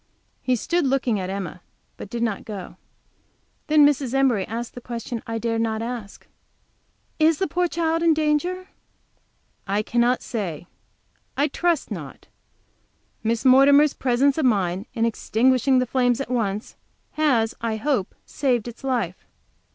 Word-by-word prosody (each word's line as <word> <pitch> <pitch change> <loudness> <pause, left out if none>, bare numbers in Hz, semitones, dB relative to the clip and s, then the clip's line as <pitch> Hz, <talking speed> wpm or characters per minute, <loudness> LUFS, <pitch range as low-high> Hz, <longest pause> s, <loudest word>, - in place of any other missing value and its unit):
He 255 - +1
stood 340 +6 0
looking 255 -5 +1
at, 185 -1 -4
Emma, 190 -2 -5 0.3
but - - -9
did 235 +1 -3
not 220 -4 -2
go. 200 -4 -8 0.9
Then 300 -1 +6
Mrs. 275 -3 +1
Embury 255 -8 +2
asked 230 +2 -5
the 245 - -9
question 235 -1 -5
I 225 - -4
had 225 - -4 0.2
not 220 -1 -1
dared - - -4
to - - -2
ask. 235 -5 -7 0.9
"Is 315 0 +4
the 380 - 0
poor 360 -1 0
child 330 -1 0
in 330 -2 +4
danger?" 315 +5 0 1.0
"I 200 +2 0
cannot 240 +2 +1
say; 180 -9 -4 0.7
I 290 +2 +2
trust 340 +1 0
not. - - -7 1.0
Miss 225 +1 -1
Mortimer's 280 +3 +6
presence 265 +3 +1
of 305 - +1
mind 195 -3 0
in 230 - +1
extinguishing 255 +3 +2
the 255 - +2
flames 245 0 +1
at 275 -3 -4
once, 215 -3 -2 0.4
has, 250 -8 +1
I 230 -1 -1
hope, 225 -3 -1
saved 245 -5 0
its 240 +2 -10
life." 235 -10 -2
245 Hz, 150 wpm, -23 LUFS, 220-285 Hz, 1.0 s, Then